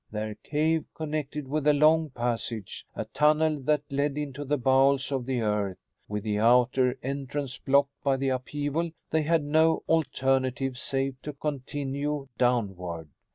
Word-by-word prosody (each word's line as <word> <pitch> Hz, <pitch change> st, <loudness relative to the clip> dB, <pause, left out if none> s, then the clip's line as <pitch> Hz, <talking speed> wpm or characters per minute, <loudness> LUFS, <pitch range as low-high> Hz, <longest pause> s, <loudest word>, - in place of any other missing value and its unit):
Their 105 Hz, 0 st, -4 dB
cave 155 Hz, +7 st, 0 dB
connected 150 Hz, -2 st, -4 dB
with 150 Hz, +1 st, -1 dB
a 150 Hz, -, +6 dB
long 155 Hz, +2 st, +4 dB
passage, 120 Hz, -4 st, -3 dB
a -, -, -3 dB
tunnel 150 Hz, 0 st, +2 dB
that 145 Hz, +2 st, +1 dB
led 140 Hz, +1 st, 0 dB
into 145 Hz, -1 st, -4 dB
the 145 Hz, +1 st, 0 dB
bowels 135 Hz, +1 st, +3 dB
of 130 Hz, -3 st, -2 dB
the 130 Hz, -3 st, 0 dB
earth. 105 Hz, -3 st, 0 dB, 0.3 s
With 105 Hz, -1 st, -3 dB
the 105 Hz, -1 st, -1 dB
outer 125 Hz, +3 st, +4 dB
entrance 135 Hz, -1 st, -4 dB
blocked 140 Hz, +1 st, +2 dB
by 135 Hz, -2 st, +2 dB
the 135 Hz, 0 st, 0 dB
upheaval 145 Hz, +5 st, -2 dB, 0.2 s
they 160 Hz, -, +3 dB
had 160 Hz, 0 st, +2 dB
no 160 Hz, +2 st, +3 dB
alternative 135 Hz, -4 st, +1 dB
save 135 Hz, -1 st, -2 dB
to 150 Hz, -, -6 dB
continue 140 Hz, 0 st, -3 dB
downward." 95 Hz, -10 st, 0 dB
135 Hz, 150 wpm, -27 LUFS, 125-150 Hz, 0.3 s, a